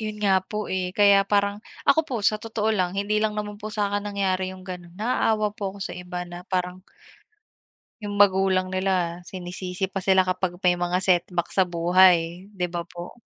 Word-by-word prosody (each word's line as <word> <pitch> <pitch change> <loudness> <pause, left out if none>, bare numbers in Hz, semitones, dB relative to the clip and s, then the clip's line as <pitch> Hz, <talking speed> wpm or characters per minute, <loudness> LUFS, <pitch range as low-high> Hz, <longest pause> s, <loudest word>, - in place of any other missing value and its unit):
'Yun 215 -1 -4
nga 190 -1 +4
po, 210 +2 -5
eh, 185 -1 -1
kaya 200 -1 +6
parang 205 0 +1 0.2
ako 320 - +5
po 255 - -2
sa 215 0 +2
totoo 220 -1 -1
lang 185 -2 -1
hindi 210 +1 0
lang 215 -1 0
naman 210 0 -5
po 215 - -5
sa'kin 205 -1 -1
nangyari 190 -2 -1
yung 185 0 -12
gano'n, 175 -2 -8
naaawa 215 -2 +1
po 200 -1 -5
ako - - -11
sa - - -5
iba 180 0 -6
na 175 0 -9
parang 180 -1 -2 1.2
'yung 205 -1 -4
magulang 190 -2 +4
nila 185 -2 -1
sinisisi 180 +1 -5
pa 195 0 -5
sila 190 -1 +4
kapag 185 -1 -2
may 180 - +5
mga 175 +1 0
setback 175 -2 0
sa 190 - +5
buhay, 175 +1 +3
'di 185 -4 -2
ba 175 -1 -4
po? 175 0 -10
190 Hz, 185 wpm, -24 LUFS, 180-205 Hz, 1.2 s, kaya